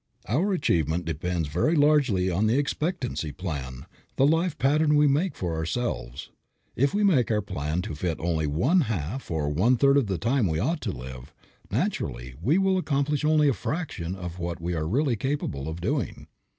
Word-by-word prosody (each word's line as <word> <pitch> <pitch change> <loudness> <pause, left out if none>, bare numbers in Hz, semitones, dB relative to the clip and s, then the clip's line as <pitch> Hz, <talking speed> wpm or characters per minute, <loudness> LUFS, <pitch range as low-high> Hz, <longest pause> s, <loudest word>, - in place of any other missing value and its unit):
Our 165 - +1
achievement 85 - +1
depends 85 +1 -2
very 90 - +1
largely 145 - +3
upon 95 +5 +1
the 115 +4 +2
expectancy 140 - -2
plan, 70 -6 -5 0.3
the 135 - +4
life 165 +3 +2
pattern 150 +3 +3
we 150 0 +5
make 150 +6 +1
for 85 -3 -3
ourselves. 80 - -3 0.4
If 140 +3 +2
we 205 +1 +1
make 150 - +3
our 105 -2 +1
plan 75 +2 -2
to - - -5
fit 80 +2 -2
only 80 -2 0
one 125 - +3
half 105 - -3
or 80 -3 -1
one 105 +12 +3
third 140 +2 +4
of 135 -6 +2
the 95 -2 -1
time 120 0 +1
we 80 -2 -1
ought 160 - 0
to - - -2
live, 65 +1 -9 0.4
naturally - - -2
we 140 - +3
will 190 -1 +2
accomplish 145 -3 0
only 150 -1 +4
a 140 - +4
fraction 100 - -4
of 90 -2 -7
what 85 0 -3
we 85 +2 -3
are 80 -2 -2
really 130 - +1
capable 110 - -3
of 80 +2 -6
doing. 130 - -2
105 Hz, 185 wpm, -26 LUFS, -, 0.4 s, we